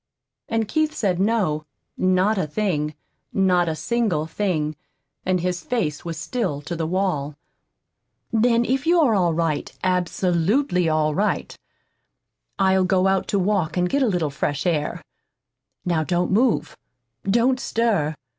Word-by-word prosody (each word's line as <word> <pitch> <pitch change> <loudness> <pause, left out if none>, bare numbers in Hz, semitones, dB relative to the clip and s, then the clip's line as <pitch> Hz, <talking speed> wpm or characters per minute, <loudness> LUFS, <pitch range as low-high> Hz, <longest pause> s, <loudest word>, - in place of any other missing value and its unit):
And 225 -1 0
Keith 310 +6 0
said 185 -5 0
no, 190 -8 +1 0.3
not 185 +3 +2
a 165 - -1
thing, 150 -4 -1 0.4
not 180 -3 +2
a 160 - -2
single 210 -6 0
thing. 160 -4 -1 0.5
And 185 -1 +2
his 180 0 -1
face 170 -12 -2
was 165 -2 -5
still 185 - -2
to 170 +3 -4
the 165 -1 -2
wall. 165 -6 -1 1.0
"Then 235 +1 +3
if 265 +5 -1
you're 330 -8 +4
all 175 -5 +2
right, 165 -3 -1
absolutely 180 - +1
all 155 -1 +1
right, 205 +7 -1 1.0
I'll 190 -1 +3
go 185 0 +2
out 190 0 +2
to 200 - 0
walk 185 -4 0
and 180 0 +2
get 280 +10 0
a 260 - +3
little 170 -6 0
fresh 145 +3 -2
air. 160 -4 -1 0.8
Now 170 -3 +1
don't 175 +3 0
move. 230 +4 +2 0.5
Don't 240 +5 +3
stir. 205 - 0
185 Hz, 140 wpm, -23 LUFS, 160-215 Hz, 1.0 s, you're